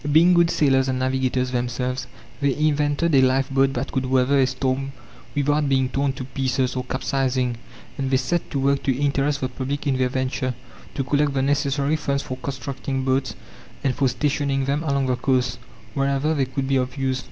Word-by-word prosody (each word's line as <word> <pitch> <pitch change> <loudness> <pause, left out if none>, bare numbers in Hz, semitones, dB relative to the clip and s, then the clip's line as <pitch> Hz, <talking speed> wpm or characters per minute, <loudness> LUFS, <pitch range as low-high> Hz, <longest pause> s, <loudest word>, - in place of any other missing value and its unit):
Being 170 +4 +6
good 170 -1 +4
sailors 135 -4 +3
and 130 -1 0
navigators 130 -1 0
themselves, 125 0 -2 0.3
they 140 -2 +1
invented 150 +1 +1
a 135 - +6
lifeboat 135 +1 +2
that 125 +2 -3
could 130 -1 -1
weather 130 +2 +3
a 130 - +4
storm 130 +1 -2 0.4
without 145 0 +1
being 130 -1 +2
torn 135 0 0
to 130 - -6
pieces 130 0 -1
or 130 - -2
capsizing, 130 -2 -1 0.4
and 135 -1 -1
they 130 - +3
set 150 +6 -1
to - - -3
work 140 +1 +2
to 130 -2 0
interest 140 0 0
the 130 - 0
public 135 +3 -4
in 135 -2 +1
their 130 -1 +2
venture, 130 0 -2 0.4
to 135 - 0
collect 145 +1 +1
the 135 - +1
necessary 140 +1 +1
funds 140 -2 -1
for 130 - -5
constructing 135 0 -4
boats, 130 0 0 0.5
and 135 - +2
for 140 0 +1
stationing 135 +1 0
them 140 +2 0
along 140 -4 0
the 130 -1 +1
coasts, 125 -1 0 0.3
wherever 140 +2 +1
they 140 -3 +1
could 135 +1 -3
be 135 0 +2
of 130 +2 -2
use. 130 -1 0
135 Hz, 190 wpm, -23 LUFS, 130-140 Hz, 0.5 s, Being